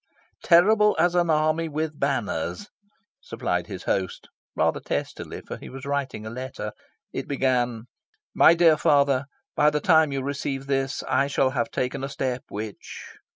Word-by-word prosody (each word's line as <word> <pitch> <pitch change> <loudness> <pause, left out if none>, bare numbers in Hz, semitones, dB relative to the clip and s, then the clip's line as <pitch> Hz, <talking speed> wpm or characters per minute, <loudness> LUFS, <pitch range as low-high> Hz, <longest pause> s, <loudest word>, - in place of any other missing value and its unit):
'" - - -35
"'Terrible 210 +5 +5
as 175 0 +3
an 175 -1 +2
army 155 +1 +2
with 155 0 -3
banners,'" 140 - -2 0.5
supplied - - -3
his - - -7
host 95 -2 -2 0.3
rather - - +1
testily, - - -4
for - - -8
he - - -10
was 135 0 -9
writing 140 -6 -3
a - - -5
letter. 125 -4 -6 0.4
It - - -4
began 125 -4 0 0.5
"My 170 - +6
dear 165 -2 +5
Father. 140 -2 +3 0.3
By 150 - +5
the 150 0 -1
time 160 -2 +4
you 135 -1 -2
receive 140 -1 -3
this 135 -1 -1
I 140 - +2
shall 135 -1 +1
have 120 -4 -1
taken 130 +3 -3
a 135 - -3
step 130 -3 -2
which..." 105 0 -7
140 Hz, 160 wpm, -25 LUFS, 130-155 Hz, 0.5 s, My